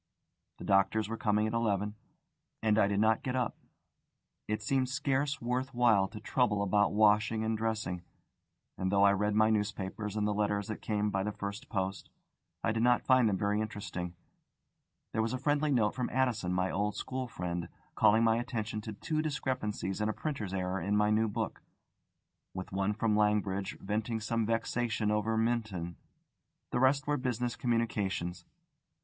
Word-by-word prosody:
The - - -9
doctors 100 +2 +2
were 115 - -3
coming 105 -1 +1
at 110 - -2
eleven, 105 -3 0 0.7
and 110 -1 +3
I 100 - +5
did 100 0 0
not 110 +1 +3
get 130 -1 -2
up. 125 -2 0 0.9
It 110 0 -2
seemed 130 +2 +1
scarce 140 +1 0
worth 125 +2 -2
while 115 -6 +4
to 105 - -9
trouble 105 -4 +1
about 105 +1 +3
washing 110 +1 +3
and 110 0 0
dressing, 110 -5 -2 0.8
and 95 0 0
though 100 0 +4
I 100 - +7
read 105 +1 0
my 110 +1 +4
newspapers 105 0 -2
and 105 -1 0
the 105 - +1
letters 105 0 0
that 110 - -5
came 105 -1 0
by 95 - 0
the 105 +2 -1
first 100 +6 -6
post, 95 -1 -3 0.5
I 115 - +2
did 110 +1 -1
not 120 0 +3
find 130 -4 +5
them 95 - 0
very 105 +2 +1
interesting. 90 -5 -5 1.0
There 110 - +1
was 115 +2 -1
a - - 0
friendly 145 +3 +1
note 110 -6 +2
from 125 -1 -2
Addison, 125 -8 0
my 90 0 0
old 105 +1 -1
school 130 0 -3
friend, 90 -5 -4 0.2
calling 110 +1 +4
my 115 0 +4
attention 115 -3 -3
to 110 0 -6
two 155 +9 -2
discrepancies 125 -9 -2
and 105 - +1
a - - 0
printer's 125 -11 -4
error 95 -1 -2
in 100 +4 +1
my 105 0 +3
new 110 +1 +3
book, 110 0 -3 0.9
with 95 -1 -6
one 95 +2 0
from 110 0 +1
Langridge 105 -2 +1
venting 110 +3 -2
some 115 0 -1
vexation 115 -1 0
over 110 +1 +1
Minton. 110 -7 -1 0.8
The - - +1
rest 135 +2 +3
were 145 0 +1
business 125 -2 -1
communications. 100 -7 -1
110 Hz, 175 wpm, -31 LUFS, 100-115 Hz, 1.0 s, I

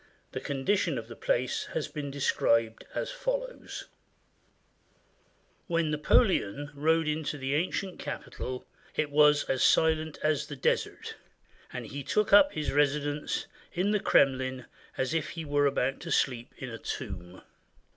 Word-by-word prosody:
The - - -4
condi 140 +8 0
tion - - 0
of - - -5
the - - -9
place - - 0
has - - -1
been 145 -3 -5
described 115 -5 +1
as - - -2
follows: - - -4 0.8
— - - -39 0.7
"When 165 -3 +1
Napoleon 150 - +2
rode 160 +2 +2
into 150 -1 -1
the 135 0 -2
ancient 180 +4 -1
capital, 125 0 -5 0.3
it 150 -2 0
was 150 0 +5
as 130 - -1
silent 160 -1 +3
as 150 -1 +1
the 145 - -6
desert, 130 - -1 0.5
and - - -5
he 140 - -6
took 210 +8 +1
up 285 +8 +8
his 150 - -2
residence 145 +1 0 0.3
in 185 +4 +1
the 210 - +2
Kremlin 130 -5 +2 0.3
as 130 +3 0
if 160 -2 0
he 165 -2 -6
were 145 0 +3
about 135 -1 0
to 170 - -7
sleep 125 -3 +1
in 130 -2 -6
a 115 - -7
tomb. 90 -6 -6
145 Hz, 150 wpm, -29 LUFS, 135-165 Hz, 0.8 s, up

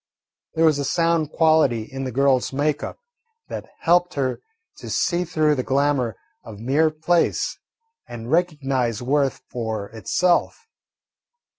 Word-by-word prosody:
There 165 +1 +3
was 155 -3 +3
a - - -1
sound 165 0 +1
quality 155 -8 +3
in 135 +4 -6
the 130 - -3
girl's 135 0 +2
make 145 +2 0
up - - -6 0.5
that - - -6
helped 175 +1 +3
her 130 -3 -1 0.4
to - - -9
see 175 0 +1
through 155 -3 +2
the 135 - -1
glamour 135 -4 +1 0.3
of 110 -3 -10
mere 140 +7 +2
place 165 +2 0 0.5
and 120 +1 -7
recognise 135 - 0
worth 140 +1 0
for 110 -4 -4
itself. 175 - 0
140 Hz, 135 wpm, -22 LUFS, 125-160 Hz, 0.5 s, There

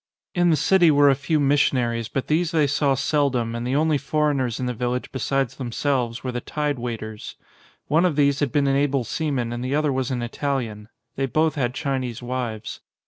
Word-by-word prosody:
In 175 0 +3
the 160 - +4
city 170 +4 +4
were 145 -1 +6
a - - +2
few 150 +3 0
missionaries 125 -5 +1
but 135 +1 -2
these 160 +2 +1
they 160 -3 +2
saw 145 -1 +1
seldom 135 -4 0
and 120 +1 -3
the 130 - 0
only 155 0 +2
foreigners 140 -4 0
in 130 - -2
the 125 - -1
village 125 +2 -3
besides 135 -1 -1
themselves 125 -1 -1
were 130 - -2
the 120 0 -4
tide 150 -1 -2
waiters. 110 -3 -6 0.5
One 160 +4 +2
of 175 -5 +2
these 140 -1 +3
had 145 -4 0
been 145 -1 +2
an 135 0 +2
able 140 -2 +1
seaman 125 -2 -2
and 120 +1 -4
the 130 +2 -1
other 150 -2 +1
was 130 -1 -1
an 125 -2 -2
Italian; 115 -4 -3 0.3
they 135 0 0
both 155 +4 +1
had 125 -4 -1
Chinese 130 -6 -2
wives. 120 -3 -4
135 Hz, 200 wpm, -23 LUFS, 120-145 Hz, 0.5 s, were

